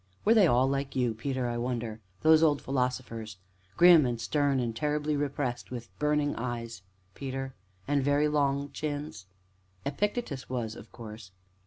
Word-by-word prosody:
"Were 220 Hz, -, +6 dB
they 210 Hz, -5 st, +6 dB
all 125 Hz, -1 st, +4 dB
like 135 Hz, 0 st, -2 dB
you, 125 Hz, -3 st, +1 dB
Peter, 130 Hz, +2 st, -2 dB
I 120 Hz, 0 st, -2 dB
wonder 120 Hz, -3 st, -3 dB, 0.2 s
those 160 Hz, 0 st, +7 dB
old 150 Hz, -3 st, +4 dB
philosophers, 125 Hz, -5 st, -2 dB, 0.4 s
grim 175 Hz, -3 st, +8 dB
and 120 Hz, -1 st, -2 dB
stern, 140 Hz, +3 st, +1 dB
and 120 Hz, -2 st, -2 dB
terribly 150 Hz, +3 st, 0 dB
repressed, 140 Hz, -4 st, -2 dB
with 120 Hz, -3 st, -7 dB
burning 150 Hz, -1 st, +1 dB
eyes, 115 Hz, -3 st, -4 dB, 0.3 s
Peter, 135 Hz, +1 st, -5 dB, 0.3 s
and 145 Hz, 0 st, +2 dB
with 135 Hz, -, -1 dB
very 145 Hz, +1 st, +3 dB
long 140 Hz, -1 st, +1 dB
chins? 145 Hz, -9 st, -5 dB, 0.6 s
Epictetus 150 Hz, -, -2 dB
was, 115 Hz, -4 st, -3 dB
of -, -, -12 dB
course!" 110 Hz, -4 st, -10 dB
135 Hz, 155 wpm, -29 LUFS, 120-145 Hz, 0.6 s, grim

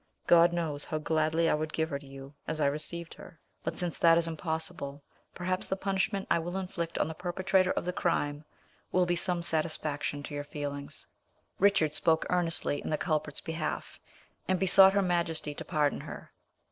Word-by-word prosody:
God 170 Hz, 0 st, +6 dB
knows 160 Hz, -4 st, -1 dB
how 155 Hz, -, -2 dB
gladly 160 Hz, +1 st, +1 dB
I -, -, +3 dB
would 155 Hz, +1 st, -1 dB
give 160 Hz, 0 st, -1 dB
her 140 Hz, -, -2 dB
to 140 Hz, -, -14 dB
you 135 Hz, +1 st, -10 dB
as 160 Hz, 0 st, -3 dB
I 150 Hz, -, +3 dB
received 155 Hz, +4 st, -2 dB
her; 170 Hz, -, -13 dB, 0.2 s
but -, -, -3 dB
since 175 Hz, -2 st, -3 dB
that 165 Hz, -1 st, +6 dB
is 170 Hz, 0 st, +2 dB
impossible, 160 Hz, -3 st, -3 dB, 0.3 s
perhaps 185 Hz, +1 st, -2 dB
the 190 Hz, -, 0 dB
punishment 195 Hz, +1 st, -1 dB
I -, -, +4 dB
will 175 Hz, +3 st, -4 dB
inflict 170 Hz, -3 st, -4 dB
on -, -, +1 dB
the 160 Hz, -, -4 dB
perpetrator 185 Hz, +2 st, +1 dB
of -, -, -2 dB
the 180 Hz, -, -1 dB
crime 145 Hz, -4 st, 0 dB, 0.5 s
will 185 Hz, 0 st, +3 dB
be 175 Hz, 0 st, +1 dB
some 175 Hz, 0 st, -1 dB
satisfaction 155 Hz, -3 st, -2 dB
to 145 Hz, -, -7 dB
your 145 Hz, 0 st, -3 dB
feelings." 145 Hz, -1 st, -5 dB, 0.5 s
Richard 190 Hz, -6 st, +4 dB
spoke 160 Hz, 0 st, +2 dB
earnestly 165 Hz, -4 st, 0 dB
in -, -, -5 dB
the 155 Hz, -, +1 dB
culprit's 155 Hz, -4 st, -1 dB
behalf, 160 Hz, -1 st, -4 dB, 0.5 s
and 185 Hz, -1 st, +1 dB
besought 190 Hz, 0 st, +8 dB
her 200 Hz, 0 st, +3 dB
majesty 170 Hz, -4 st, 0 dB
to -, -, -6 dB
pardon 150 Hz, -4 st, +1 dB
her. -, -, -9 dB
165 Hz, 185 wpm, -30 LUFS, 150-180 Hz, 0.5 s, besought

